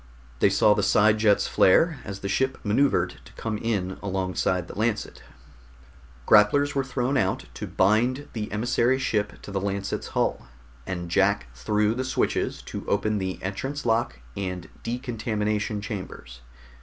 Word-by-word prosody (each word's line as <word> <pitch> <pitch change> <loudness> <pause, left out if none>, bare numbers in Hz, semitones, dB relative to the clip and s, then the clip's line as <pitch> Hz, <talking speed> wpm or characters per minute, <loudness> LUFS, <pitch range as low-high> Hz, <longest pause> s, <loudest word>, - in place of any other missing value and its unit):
They - - +5
saw 100 +2 +4
the - - 0
side 110 +1 +4
jets 105 -2 +3
flare 155 - +4
as 100 -1 -7
the 100 - -3
ship 130 +6 0
maneuvered 115 +7 +1
to - - -15
come 110 -2 -4
in 100 -5 -2
alongside 95 -2 -1
the - - -9
Lancet. 110 0 -2 1.0
Grapplers 140 +8 +5
were 135 - +1
thrown 135 0 -1
out - - 0
to - - -6
bind 120 +8 +2
the 110 -2 -4
emissary 120 +4 +2
ship 105 -6 -1
to - - -8
the 95 -1 -2
Lancet's 100 0 -3
hull, - - 0 0.4
and 90 -2 -4
Jack 95 -7 +2
threw 105 - +1
the 130 +2 -2
switches 130 - -1
to - - -6
open 105 -1 +1
the 95 -1 -3
entrance 135 +10 -4
lock 115 - +1 0.2
and 90 -3 -4
decontamination 110 -4 -2
chambers. 90 - -7
105 Hz, 150 wpm, -25 LUFS, 95-120 Hz, 1.0 s, They